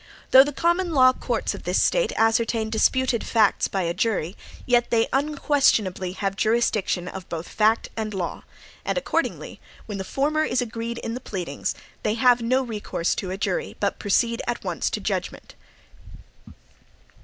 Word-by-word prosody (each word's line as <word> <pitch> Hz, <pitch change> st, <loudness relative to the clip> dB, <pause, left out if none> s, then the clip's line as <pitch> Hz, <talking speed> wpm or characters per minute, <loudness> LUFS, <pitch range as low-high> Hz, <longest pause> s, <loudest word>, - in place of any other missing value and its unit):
Though 265 Hz, -, +10 dB
the 290 Hz, -, -3 dB
common 345 Hz, +3 st, 0 dB
law 255 Hz, -1 st, +6 dB
courts -, -, -2 dB
of -, -, -8 dB
this -, -, 0 dB
State -, -, +2 dB
ascertain 225 Hz, 0 st, +1 dB
disputed 250 Hz, +2 st, +2 dB
facts 220 Hz, -3 st, +2 dB
by 190 Hz, -2 st, -2 dB
a 170 Hz, 0 st, -1 dB
jury, 190 Hz, -3 st, -1 dB, 0.3 s
yet 240 Hz, -1 st, +2 dB
they 230 Hz, -1 st, +2 dB
unquestionably 270 Hz, -, +1 dB
have 195 Hz, 0 st, -2 dB
jurisdiction 215 Hz, -5 st, +1 dB
of 190 Hz, -1 st, -8 dB
both 165 Hz, 0 st, -5 dB
fact 220 Hz, +1 st, +1 dB
and 220 Hz, -1 st, -3 dB
law; 185 Hz, -4 st, -4 dB, 0.4 s
and -, -, -2 dB
accordingly -, -, -2 dB, 0.3 s
when 205 Hz, -3 st, -6 dB
the -, -, -2 dB
former 295 Hz, +9 st, 0 dB
is 250 Hz, -4 st, 0 dB
agreed 230 Hz, -1 st, -4 dB
in 230 Hz, -, -4 dB
the 250 Hz, -, -4 dB
pleadings, 180 Hz, -, -4 dB, 0.3 s
they 215 Hz, 0 st, 0 dB
have 245 Hz, 0 st, +4 dB
no 255 Hz, +3 st, +1 dB
recourse 210 Hz, -7 st, -2 dB
to 185 Hz, -, -4 dB
a 190 Hz, -, -4 dB
jury, 475 Hz, -, -2 dB
but -, -, -1 dB
proceed 230 Hz, +3 st, +1 dB
at 240 Hz, -, -2 dB
once -, -, -1 dB
to -, -, -3 dB
judgment. -, -, -4 dB
230 Hz, 165 wpm, -24 LUFS, 195-255 Hz, 0.4 s, Though